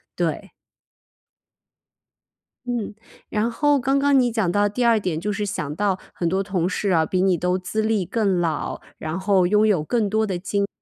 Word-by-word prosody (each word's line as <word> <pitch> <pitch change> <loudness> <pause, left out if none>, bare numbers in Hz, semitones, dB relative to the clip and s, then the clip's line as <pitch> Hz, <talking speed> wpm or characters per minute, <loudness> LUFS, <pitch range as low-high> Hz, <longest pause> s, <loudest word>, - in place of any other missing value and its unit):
对。 - - -2 2.1
嗯， 235 -4 -3 0.3
然 220 +2 0
后 290 +3 +2
刚 270 +2 +1
刚 280 -1 +4
你 245 -2 +3
讲 220 -6 0
到 205 +2 +2
第 225 +5 -4
2 230 -2 +4
点， 175 -5 -2
就 205 +5 -2
是 205 0 -2
想 150 -7 -4
到 195 0 0
很 170 -1 -1
多 190 +2 0
同 185 -3 -1
事 200 0 -1
啊， 160 -2 +3
比 185 +3 0
你 185 -1 +3
都 180 +2 0
资 185 +4 -2
历 215 -4 0
更 200 -2 0
老， 165 -3 -2 0.2
然 160 +3 -4
后 190 -1 +3
拥 210 +4 +3
有 185 -8 +2
更 215 +4 0
多 220 +1 +1
的 185 -4 -3
经 200 +2 -1
验， 200 - 0
200 Hz, 200 characters per minute, -22 LUFS, 180-220 Hz, 2.1 s, 刚